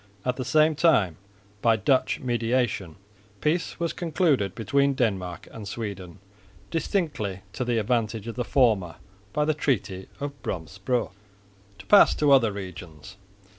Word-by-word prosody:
At 125 -1 0
the 130 - -2
same 155 +3 +4
time 135 - +3 0.4
by 115 -1 +4
Dutch 130 +5 +1
mediation 120 -7 -1 0.4
peace 160 +3 -1
was 170 -1 -1
concluded 155 - +1
between 140 +4 +1
Denmark 95 - -2
and 110 -3 -8
Sweden, 100 -5 -6 0.5
distinctly 150 - -2
to - - -2
the 120 -1 0
advantage 110 -1 0
of 115 - -5
the 125 - -1
former, 110 -11 +2 0.4
by 150 +6 +1
the 155 - +2
treaty 110 -10 -2
of 145 0 -3
Brömsebro. 95 +9 -3 0.7
To - - -13
pass 205 - +6
to 150 -2 +2
other 125 -6 +5
regions. 95 -2 -9
115 Hz, 135 wpm, -26 LUFS, 95-140 Hz, 0.7 s, pass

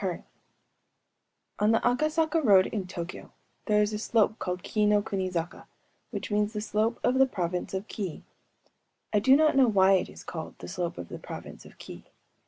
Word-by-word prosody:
MUJINA 185 -3 -3 1.4
On 210 - +3
the 225 - +4
Akasaka 310 +5 +1
Road, 195 -6 +6
in 200 -4 -4
TŇćkyŇć, 175 -1 -7 0.4
there 210 -1 +4
is 210 +1 -2
a 210 - -3
slope 220 0 +1
called 180 0 -4
Kii 210 -1 +1
no 210 0 +4
kuni 190 -3 -2
zaka,‚ÄĒwhich 175 +4 -7
means 210 +1 +1
the 210 - -3
Slope 220 +2 -1
of 255 +2 +2
the 265 - +6
Province 180 -4 -3
of 190 +2 -4
Kii. 190 -7 -5 0.9
I 210 - +4
do 260 +6 +5
not 305 0 +4
know 265 -2 +5
why 195 -3 +4
it 190 - +1
is - - -12
called 160 -2 -7
the - - -9
Slope 175 -2 -4
of 85 - -7
the - - -7
Province - - -9
of - - -18
Kii. - - -11
210 Hz, 190 wpm, -28 LUFS, 185-230 Hz, 1.4 s, Road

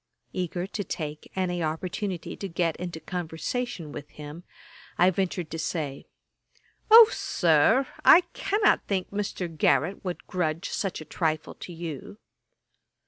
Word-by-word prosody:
Eager 180 -1 -2
to 205 +1 -4
take 150 -4 -6
any 180 -2 -1
opening 180 +4 -2
to 195 +4 -7
get 165 -1 0
into 175 -2 -5
conversation 175 +2 -4
with 145 -1 -8
him, 150 +3 -9 0.5
I 180 +2 +5
ventured 180 -3 -2
to 165 - -4
say, 150 -4 -3 0.8
'O, 450 0 +11
Sir, 175 - +3 0.2
I 345 - +9
cannot 410 +1 +2
think 190 -2 -1
Mr. 200 -3 -3
Garrick 160 +2 +1
would 180 -2 -5
grudge 165 -3 -2
such 195 -5 -2
a - - -8
trifle 155 0 -1
to - - -9
you.' 165 +2 -7
175 Hz, 135 wpm, -27 LUFS, 160-190 Hz, 0.8 s, O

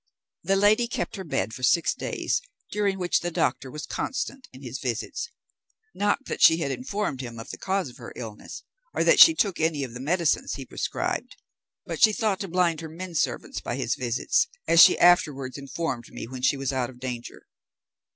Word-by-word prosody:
The 195 +3 +1
lady 210 +4 +4
kept 240 - -3
her 190 - -5
bed 145 -8 -2
for 130 - -8
six 160 +7 +3
days, - - -2 0.3
during 205 -2 0
which 180 -2 +1
the 175 - -3
doctor 140 -5 -1
was 150 +4 -7
constant 270 0 -4
in 130 +2 -13
his 125 0 -6
visits; 125 - -3 0.6
not 205 +7 0
that - - -5
she 160 - +8
had 145 -5 -2
informed 210 - -3
him 120 -2 -7
of 115 - -8
the - - -9
cause 190 -3 -1
of 125 - -15
her 120 -3 -9
illness, 110 -3 -8 0.3
or - - +2
that - - +5
she 325 - +10
took 200 - 0
any 160 -3 +1
of 125 -3 -6
the 125 - -7
medicines 165 +4 0
he - - -7
prescribed; - - -3 0.5
but - - -5
she 215 -2 +7
thought 210 -3 0
to 195 - -4
blind 170 -2 +1
her 160 - -7
men 175 +3 -7
servants 140 -6 -2
by 120 - -3
his 125 -3 -1
visits, 125 - +1 0.2
as 165 - +7
she - - +8
afterwards 155 -7 +3
informed 140 -3 -4
me - - -7
when 130 +1 -8
she 135 +2 +2
was 135 0 -2
out 125 -2 -1
of 125 -1 -14
danger. 125 -2 -6
160 Hz, 200 wpm, -26 LUFS, 130-190 Hz, 0.6 s, she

